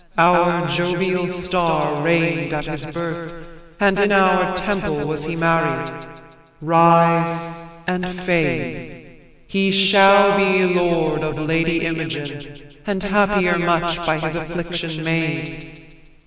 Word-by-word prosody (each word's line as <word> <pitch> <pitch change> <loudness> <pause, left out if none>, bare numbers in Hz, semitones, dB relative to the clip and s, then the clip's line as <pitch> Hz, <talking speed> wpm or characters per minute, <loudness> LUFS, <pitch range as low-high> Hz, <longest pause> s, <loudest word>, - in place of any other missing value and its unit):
Our 175 0 +3
Jovial 175 +1 -1
star 180 -4 -1
reign'd 165 -1 0
at 150 0 -4
his 155 -1 -7
birth, 170 +1 -7 0.3
and 200 -1 +2
in 200 0 +2
Our 190 -1 +2
temple 185 -6 -3
was 150 0 -4
he 165 +1 -4
married. 165 0 0 0.7
Rise 170 +1 +2 0.2
and 180 0 -2
fade! 175 -3 -3 0.4
He 195 -1 0
shall 195 +1 +5
be 190 -2 +2
lord 170 -3 0
of 155 0 -4
Lady 165 +2 -1
Imogen, 145 -3 -7
And 200 -2 -3
happier 200 -3 +1
much 170 -1 0
by 155 -1 0
his 160 0 -4
affliction 170 -1 -5
made. 160 -1 -5
170 Hz, 115 wpm, -19 LUFS, 160-180 Hz, 0.7 s, shall